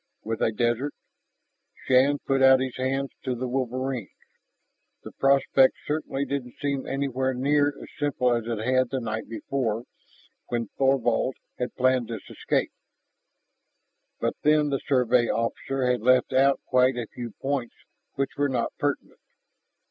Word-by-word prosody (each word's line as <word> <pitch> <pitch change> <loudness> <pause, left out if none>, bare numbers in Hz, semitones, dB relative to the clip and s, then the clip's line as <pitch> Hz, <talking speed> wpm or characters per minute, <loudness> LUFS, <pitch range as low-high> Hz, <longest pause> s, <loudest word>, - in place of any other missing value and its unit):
With 110 0 -3
a - - +2
desert.... 120 +5 0 0.9
Shann 135 +3 +4
put 135 -1 +1
out 130 0 +7
his 130 -1 -3
hands 135 +1 -1
to 130 -2 -2
the 125 +2 -3
wolverines. 130 -2 -2 0.9
The - - -9
prospect 135 -1 +4
certainly 145 -2 -2
didn't 135 -4 -4
seem 140 -2 -2
anywhere 130 -1 -1
near 145 +3 +3
as 145 - -6
simple 130 -4 +1
as 115 -2 -1
it 115 -2 -2
had 130 0 +2
the 135 - -2
night 110 -2 -4
before 115 -1 -2 0.6
when 115 -3 -2
Thorvald 130 -2 +2 0.2
had 125 - -3
planned 130 -2 +2
this 115 -4 -7
escape. - - -1 1.5
But - - 0
then 150 0 +3
the 135 -1 0
Survey 125 -3 +3
officer 125 +4 -1
had 125 -2 +1
left 130 +2 +3
out 135 +1 +4
quite 130 0 +3
a 120 - -2
few 120 -3 -6
points 135 -3 -2 0.4
which 135 0 -1
were 145 0 +1
not 125 -3 -1
pertinent. 145 -1 -2
130 Hz, 145 wpm, -26 LUFS, 120-135 Hz, 1.5 s, out